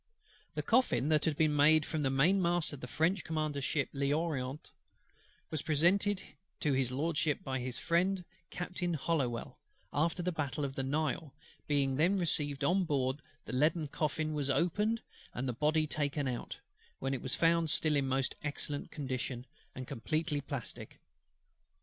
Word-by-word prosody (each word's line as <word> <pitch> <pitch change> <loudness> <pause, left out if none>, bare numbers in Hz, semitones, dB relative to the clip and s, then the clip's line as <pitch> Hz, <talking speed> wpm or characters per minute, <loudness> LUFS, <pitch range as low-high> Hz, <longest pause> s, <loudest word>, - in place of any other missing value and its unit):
The - - -1
coffin 155 - +3
that 155 -1 +3
had 155 -3 +1
been 155 -2 +3
made 150 +1 +6
from 155 - -2
the 135 - +2
mainmast 175 +4 +3
of 145 - -7
the 125 - -5
French 160 +7 +1
Commander's 155 -3 -2
ship 150 -3 0
L'Orient, 140 -1 -1 0.8
and 155 -3 -2
presented 185 +6 +3 0.4
to 150 -4 +1
HIS 130 -2 +1
LORDSHIP 150 +2 0
by 130 -1 -2
his 125 0 -3
friend 180 +2 +1 0.2
Captain 175 -1 -2
HOLLOWELL, 135 -6 -1 0.3
after 165 +4 +1
the 180 - 0
battle 150 -2 -2
of 135 - -4
the 135 - -2
Nile, 150 +1 -1 0.3
being 140 -3 +2
then 175 +6 +3
received 150 -5 +1
on 185 +6 +3
board, 140 -3 0 0.2
the - - -6
leaden 155 +4 +2
coffin 155 0 -1
was 145 -2 -1
opened, 205 +10 +1 0.3
and 130 +2 -2
the 125 - -1
Body 155 +5 +2
taken 145 -1 -1
out; 125 -2 -4 0.4
when 135 +1 -2
it 130 - -2
was 130 0 -2
found 165 -1 +3
still 155 0 +2
in 140 -2 +2
most 135 0 0
excellent 145 -1 -3
condition, 130 -3 -4 0.3
and 130 - -5
completely 155 +4 -1
plastic. 140 -4 -5
150 Hz, 160 wpm, -33 LUFS, 135-165 Hz, 0.8 s, made